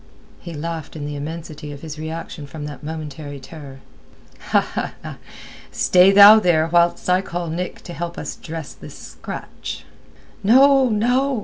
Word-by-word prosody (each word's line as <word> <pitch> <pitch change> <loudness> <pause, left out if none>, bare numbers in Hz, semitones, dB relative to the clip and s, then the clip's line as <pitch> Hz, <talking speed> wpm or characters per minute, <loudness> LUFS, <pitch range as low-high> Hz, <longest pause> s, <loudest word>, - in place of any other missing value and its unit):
He 170 - -9
laughed 165 +1 -5
in 150 -2 -5
the 145 0 -5
immensity 155 0 -7
of 145 +1 -10
his 155 -1 -7
reaction 160 -2 -6
from 145 0 -8
that 145 -3 -8
momentary 150 -2 -7
terror. 135 -1 -11 1.9
"Stay 180 +1 +5
thou 205 +2 +9
there 170 -6 +3
whilst 170 0 +2
I 180 +1 +3
call 175 -3 -5
Nick 180 +2 -4
to 175 - -8
help 170 0 -5
us - - -5
dress 160 -2 -8
this - - -12
scratch." - - -8 0.6
"No, 265 +4 +5
no!" 245 +4 +1
165 Hz, 140 wpm, -21 LUFS, 150-185 Hz, 1.9 s, thou